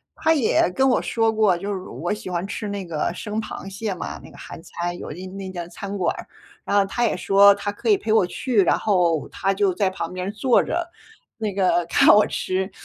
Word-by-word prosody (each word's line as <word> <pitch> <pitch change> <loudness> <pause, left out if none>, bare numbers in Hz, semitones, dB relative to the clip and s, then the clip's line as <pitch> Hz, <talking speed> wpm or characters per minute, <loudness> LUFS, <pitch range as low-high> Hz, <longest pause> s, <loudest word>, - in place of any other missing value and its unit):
他 320 - +2
也 235 - +2
跟 265 +5 +3
我 - - +2
说 225 -1 +1
过 215 -5 +3
就 200 +3 -4
是 190 - -3
我 175 +1 -4
喜 210 -3 -7
欢 180 +2 -2
吃 210 0 -5
那 200 -2 -4
个 155 -3 -2
生 215 0 -4
螃 215 - -8
蟹 200 +1 -4
嘛， - - -6
那 - - -13
个 - - -15
韩 - - -10
餐 175 +1 -4
有 - - -7
一 180 +5 -8
那 190 0 -7
家 175 -2 -6
餐 200 +3 -6
馆 185 - 0
儿， - - -8 0.4
然 205 - 0
后 200 - +4
他 240 +5 -2
也 220 -5 +1
说 200 +2 +6
他 205 0 -3
可 205 - -4
以 410 - +5
陪 220 - -1
我 220 - +4
去， 220 +3 +1
然 180 - +3
后 175 -7 +1
他 195 - -1
就 195 -2 +2
在 195 0 +1
旁 185 - -5
边 185 +2 -4
坐 230 +3 +3
着， 345 0 -2 0.5
那 215 -2 -2
个 185 -3 +2
看 - - +3
我 210 - +5
吃， 190 +1 -2
200 Hz, 250 characters per minute, -22 LUFS, 185-215 Hz, 0.5 s, 说